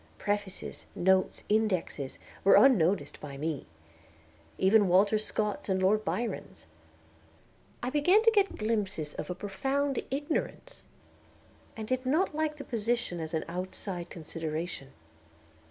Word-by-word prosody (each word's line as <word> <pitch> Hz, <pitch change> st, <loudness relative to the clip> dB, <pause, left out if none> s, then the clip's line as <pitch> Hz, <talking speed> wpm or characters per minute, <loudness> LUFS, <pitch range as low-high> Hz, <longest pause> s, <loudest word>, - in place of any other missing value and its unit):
Prefaces, 205 Hz, -1 st, -3 dB
notes, 190 Hz, +1 st, +2 dB
indexes, 190 Hz, -10 st, 0 dB, 0.3 s
were 195 Hz, -, +7 dB
unnoticed 200 Hz, -8 st, +4 dB
by 140 Hz, -2 st, -7 dB
me, 150 Hz, -1 st, -3 dB, 0.9 s
even 200 Hz, +1 st, +5 dB
Walter 200 Hz, +4 st, +4 dB
Scott's 210 Hz, -1 st, -2 dB
and 190 Hz, 0 st, +2 dB
Lord 205 Hz, +3 st, +3 dB
Byron's. 220 Hz, +5 st, -4 dB, 1.2 s
I 250 Hz, -, -1 dB
began 355 Hz, +10 st, +4 dB
to 455 Hz, -, +6 dB
get 405 Hz, -3 st, +2 dB
glimpses 200 Hz, -9 st, -1 dB
of -, -, -6 dB
a 180 Hz, -, -2 dB
profound 270 Hz, +8 st, -1 dB
ignorance, 300 Hz, -, -3 dB, 0.9 s
and 220 Hz, -1 st, -5 dB
did 255 Hz, +1 st, 0 dB
not 305 Hz, +7 st, +1 dB
like 310 Hz, 0 st, -1 dB
the 280 Hz, -, -6 dB
position 230 Hz, -6 st, -1 dB
as 160 Hz, 0 st, -4 dB
an 160 Hz, -, -1 dB
outside 180 Hz, 0 st, -5 dB
consideration. 160 Hz, -3 st, -5 dB
205 Hz, 120 wpm, -30 LUFS, 175-255 Hz, 1.2 s, were